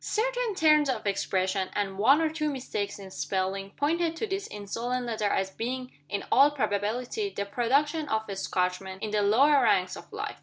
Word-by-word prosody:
Certain - - -1
turns 305 -4 +4
of 260 - -2
expression, 190 -1 0
and 200 -2 -1
one 275 +9 +5
or 320 - +2
two 305 -1 -1
mistakes 250 -7 -3
in 195 -2 -10
spelling, 195 +1 -2
pointed 325 +8 0
to 390 - -2
this 390 -1 -3
insolent 235 +5 -3
letter 220 -3 -1
as 190 -1 0
being, 255 +4 -4 0.2
in 200 - -2
all 280 +2 +7
probability, 250 - -1
the 200 - -1
production 280 +8 +1
of 220 -2 0
a 200 - -4
Scotchman, 190 0 -2
in 210 +2 -5
the 210 -1 +2
lower 270 +8 +5
ranks 185 -6 +2
of - - -12
life. - - -5
230 Hz, 185 wpm, -28 LUFS, 200-295 Hz, 0.2 s, all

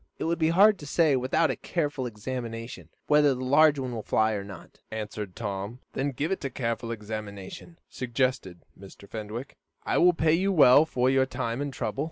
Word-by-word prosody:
"It - - -4
would 170 +1 -1
be 160 0 +3
hard 200 +4 +5
to 145 - -9
say, 155 -2 +3
without 130 +5 +1
a - - -3
careful 145 -6 -2
examination, 115 +1 -6 0.2
whether 150 -2 +4
this 125 - -5
large 145 +3 +5
one 130 -2 -3
will 115 - -4
fly 110 +1 +1
or 100 -2 -3
not," 100 -4 -12
answered 105 -3 -6
Tom. 100 +1 -5 0.2
"Then 140 +2 -1
give 145 +6 -3
it 195 - -2
a 135 - -2
careful 115 -2 -3
examination," 105 - -7
suggested 125 -7 -2
Mr. 100 +1 -14
Fenwick. 110 +5 -7 0.3
"I'll 180 0 +4
pay 160 -1 +2
you 190 +4 +2
well 145 -4 +7
for 125 -4 0
your 135 0 +3
time 120 0 -3
and 145 -1 -3
trouble." 135 - -4
130 Hz, 190 wpm, -27 LUFS, 110-150 Hz, 0.3 s, well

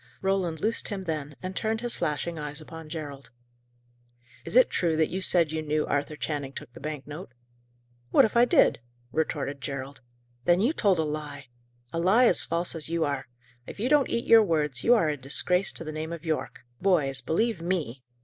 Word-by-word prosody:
Roland 190 -4 0
loosed 225 +2 -1
him 200 -3 -3
then, 150 -4 -4
and 185 +1 -5
turned 220 0 -1
his 240 -1 -1
flashing 165 +1 -2
eyes 150 0 -5
upon 160 0 -10
Gerald. 145 -5 -7 1.2
"Is - - -5
it 255 - +6
true 170 -3 +1
that 160 -1 +2
you 190 - -2
said 170 -4 +3
you 160 0 -2
knew 155 0 0
Arthur 145 +1 -1
Channing 145 -3 -4
took 120 - -9
the - - -11
bank 150 -1 -5
note?" 150 -2 -8 0.8
"What - - +6
if 220 - -3
I 235 +1 +6
did?" - - +4 0.3
retorted 145 -3 -2
Gerald. 135 +1 -6 0.4
"Then 175 +3 +4
you 240 +10 +2
told 200 - +2
a 160 - +1
lie! 150 -3 -5 0.4
A 165 - -1
lie 200 +9 +5
as 180 - +5
false 170 +1 -1
as 160 -2 -4
you 165 -1 +1
are. 140 -1 -3 0.4
If - - -9
you 240 +5 0
don't 290 -3 +4
eat 235 - -1
your 225 -1 +8
words, 150 -8 0
you 245 - +6
are 190 -9 +2
a 150 - 0
disgrace 180 +8 +1
to - - -4
the 155 - -5
name 155 +1 -5
of 170 0 -7
Yorke. 160 -2 -3 0.2
Boys, 150 -9 +3
believe 225 +7 0
_me! 165 -8 -2
160 Hz, 200 wpm, -27 LUFS, 150-190 Hz, 1.2 s, your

